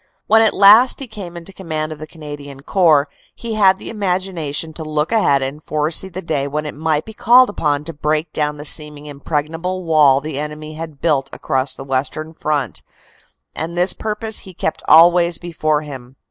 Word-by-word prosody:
When 220 +1 +5
at 220 - +3
last 215 +6 +6
he 275 - -4
came 200 -7 -9
into 170 +3 -6
command 155 -4 -4
of 155 - -8
the 155 - -8
Canadian 145 -3 -10
Corps, 155 -4 +3 0.3
he 230 -1 -6
had 195 -3 +4
the - - -8
imagination 180 -7 -2
to 160 - -7
look 155 +2 -2
ahead 145 -12 +2
and 140 +3 -5
foresee 155 +5 -2
the 185 +1 -7
day 145 -4 -1
when 150 +2 -3
it 150 - -5
might 155 0 -1
be 220 - -10
called 245 +2 +5
upon 150 -6 -1
to 165 +2 -7
break 155 +1 -2
down 150 -1 -1
the 145 - -8
seeming 150 -1 +1
impregnable 160 +5 -4
wall 150 -5 +4
the 150 -1 -5
enemy 150 +1 -6
had 155 -2 -8
built 140 -5 +1
across 130 0 -1
the 135 - -8
western 135 +4 -3
front, 150 -6 -2 0.7
and 165 +2 -5
this 180 +1 +3
purpose 220 0 -3
he 185 -2 -12
kept 160 - -3
always 170 +1 +6
before 155 -3 -1
him. 130 -3 -10
155 Hz, 190 wpm, -18 LUFS, 150-180 Hz, 0.7 s, last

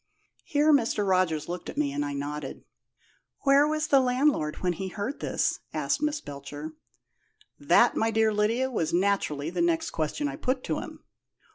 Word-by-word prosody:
Here 300 +1 +3
Mr. 225 -6 +2
Rogers 185 -5 +1
looked 175 0 -5
at - - -8
me, 145 -2 +1
and 145 +1 -2
I 145 0 -3
nodded. 145 0 -5 0.8
"Where 280 +1 +5
was 310 0 0
the 275 - +6
landlord 255 - +1
when 180 -1 -1
he 190 +3 -5
heard 205 +9 -4
this?" - - -1 0.2
asked - - 0
Miss 300 0 0
Belcher. 145 - -8 0.9
"That, 175 +11 +4
my 225 - +1
dear 220 -1 +2
Lydia, 230 +5 +1
was 165 -10 -1
naturally 175 -6 0
the 175 -1 -1
next 170 -1 +1
question 160 - -2
I - - -5
put 255 0 -1
to - - -2
him. - - -9
200 Hz, 170 wpm, -27 LUFS, 155-260 Hz, 0.9 s, the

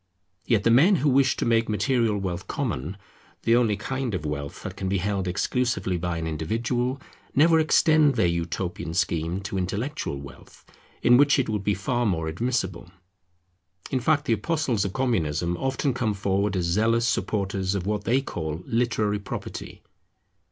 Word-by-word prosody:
Yet 110 -4 +2
the 115 - +4
men 160 - +6
who 150 -3 +1
wish 135 0 +3
to - - -1
make 115 -1 +2
material 110 0 +1
wealth 95 -2 -4
common, 80 +10 -3 0.5
the 115 - +4
only 115 -4 +2
kind 130 +1 -3
of 80 - -4
wealth 70 -1 -5
that - - -6
can 95 - -3
be 100 - +1
held 95 0 -1
exclusively 100 +1 0
by 90 0 -2
an 80 - -3
individual, 120 - -1 0.4
never 160 +4 +5
extend 155 -2 +4
their - - +2
utopian 85 0 -2
scheme 85 0 0
to 100 -1 -3
intellectual 100 - -3
wealth, 70 -1 -13 0.4
in 120 0 +6
which 145 +1 +5
it 135 - 0
would 105 -2 -2
be 100 0 +1
far 120 +3 -1
more 80 -5 -1
admissible. 95 -1 -2 1.0
In 130 - +1
fact 150 +3 +1
the 120 - +2
apostles 125 -2 0
of 100 - -2
Communism 85 - 0
often 135 - -1
come 110 -4 -1
forward 100 +1 0
as 90 -2 0
zealous 115 +6 +2
supporters 100 -3 -1
of 95 -3 -2
what 105 0 -1
they 130 +5 +2
call 80 - -5
literary 110 -3 0
property. 100 - -7
105 Hz, 165 wpm, -25 LUFS, 90-125 Hz, 1.0 s, men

